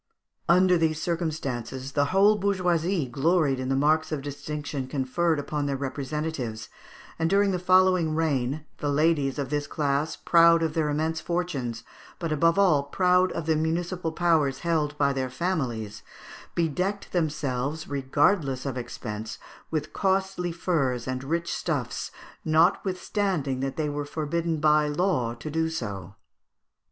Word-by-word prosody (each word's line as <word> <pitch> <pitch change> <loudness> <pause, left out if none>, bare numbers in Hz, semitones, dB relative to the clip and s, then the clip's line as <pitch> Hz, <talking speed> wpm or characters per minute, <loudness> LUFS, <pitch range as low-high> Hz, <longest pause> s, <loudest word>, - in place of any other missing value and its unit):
Under 180 0 +5
these 160 -1 +1
circumstances, 140 -7 -3
the 145 0 +2
whole 195 +7 +4
bourgeoisie 180 -4 +1
gloried 140 +2 +1
in 130 0 -3
the 135 - +2
marks 155 +4 +2
of 145 -3 -3
distinction 145 -1 -5
conferred 150 +5 0
upon 145 0 -2
their 140 -1 -1
representatives, 135 -4 -4 0.5
and 165 0 +1
during 200 +1 +3
the 180 - -1
following 185 -3 +3
reign, 145 -2 0
the 145 - -1
ladies 145 -2 +2
of 140 -1 -3
this 145 -1 -1
class, 145 +1 -1
proud 170 -1 +5
of 160 -2 -1
their 155 -2 0
immense 160 +2 -1
fortunes, 140 -10 -3 0.3
but 165 -2 -3
above 165 +3 +3
all 180 -8 +4
proud 180 +5 +2
of 165 - -4
the 160 -1 +2
municipal 165 +2 -1
powers 160 -6 +1
held 155 -4 0
by 140 -1 +2
their 130 -1 -2
families, 125 - -2 0.5
bedecked 180 +5 -1
themselves, 150 -3 -2
regardless 140 0 +1
of 135 -2 -3
expense, 110 -2 -6 0.3
with 155 -1 -3
costly 190 -2 0
furs 140 -9 -1
and 130 0 -3
rich 170 +4 -2
stuffs, - - -2 0.3
notwithstanding 175 -2 +1
that 135 0 -2
they 155 -1 0
were 145 0 -3
forbidden 160 +2 -2
by 150 0 +4
law 145 -7 0
to 120 +6 -7
do 160 +1 0
so. 100 - -5
155 Hz, 145 wpm, -26 LUFS, 135-170 Hz, 0.5 s, Under